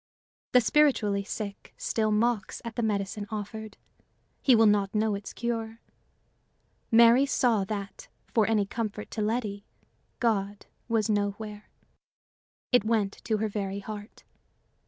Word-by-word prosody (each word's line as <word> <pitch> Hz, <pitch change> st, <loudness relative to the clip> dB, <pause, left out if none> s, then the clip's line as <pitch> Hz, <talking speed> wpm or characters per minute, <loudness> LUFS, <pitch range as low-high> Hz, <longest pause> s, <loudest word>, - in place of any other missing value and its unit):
The 250 Hz, -, +7 dB
spiritually 225 Hz, -6 st, +3 dB
sick 200 Hz, 0 st, -6 dB
still 220 Hz, -1 st, 0 dB
mocks 220 Hz, -1 st, 0 dB
at 230 Hz, -1 st, -6 dB
the 240 Hz, -, -1 dB
medicine 205 Hz, -1 st, -2 dB
offered; 215 Hz, 0 st, -6 dB, 0.6 s
he 260 Hz, -, +5 dB
will 225 Hz, 0 st, +5 dB
not 205 Hz, -1 st, +2 dB
know 215 Hz, 0 st, +2 dB
its 200 Hz, 0 st, -5 dB
cure. 230 Hz, -1 st, -3 dB, 1.1 s
Mary 235 Hz, +3 st, +6 dB
saw 235 Hz, -7 st, +2 dB
that, 200 Hz, -1 st, -6 dB, 0.3 s
for 220 Hz, -3 st, +3 dB
any 215 Hz, -2 st, +2 dB
comfort 215 Hz, 0 st, -4 dB
to 220 Hz, -, -3 dB
Letty, 210 Hz, -2 st, -1 dB, 0.6 s
God 205 Hz, -4 st, 0 dB, 0.2 s
was 225 Hz, -3 st, +1 dB
nowhere. 210 Hz, 0 st, -2 dB, 1.0 s
It 245 Hz, -4 st, +5 dB
went 215 Hz, -3 st, 0 dB
to 220 Hz, -, +1 dB
her 220 Hz, +1 st, 0 dB
very 200 Hz, -2 st, -3 dB
heart. 210 Hz, +1 st, -8 dB
215 Hz, 130 wpm, -28 LUFS, 205-230 Hz, 1.1 s, The